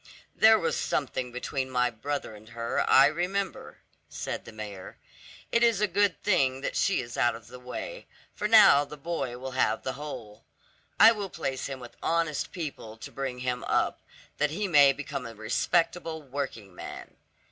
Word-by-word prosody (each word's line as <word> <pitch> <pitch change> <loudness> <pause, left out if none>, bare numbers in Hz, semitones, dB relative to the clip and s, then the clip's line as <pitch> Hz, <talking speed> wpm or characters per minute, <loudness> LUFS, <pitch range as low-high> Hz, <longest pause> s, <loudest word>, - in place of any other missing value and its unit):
"There 220 0 +7
was 165 - -1
something 130 -3 -2
between 130 +2 -3
my 125 -1 +1
brother 140 +2 -4
and 105 +1 -14
her, 115 0 -2
I 135 - +8
remember," 180 +6 -2 0.3
said - - -5
the - - -9
mayor; 105 -4 -8 0.5
"it 235 - +3
is 230 -4 +4
a 210 - +3
good 200 -1 +1
thing 135 -10 +2
that - - -3
she 195 -8 +2
is 120 -1 -8
out 120 - +2
of 115 0 -12
the 125 +1 -10
way, 315 - -7 0.3
for 210 - -2
now 210 -10 +8
the 150 +1 -10
boy 140 -5 -3
will 130 +1 -6
have 130 - +1
the 130 - -2
whole. 115 -7 -8 0.6
I 225 - +10
will 205 -4 -4
place 135 -7 -3
him 135 -2 -6
with 120 -1 -12
honest 165 -3 0
people 140 -10 -6
to - - -9
bring 130 -2 -4
him 125 -1 -2
up, - - 0 0.4
that 150 +1 +2
he 200 +7 -2
may 145 -5 +7
become 135 -3 -5
a 115 - -10
respectable 160 +8 0
working 130 -8 -5
man." - - -9
135 Hz, 180 wpm, -28 LUFS, 125-170 Hz, 0.6 s, I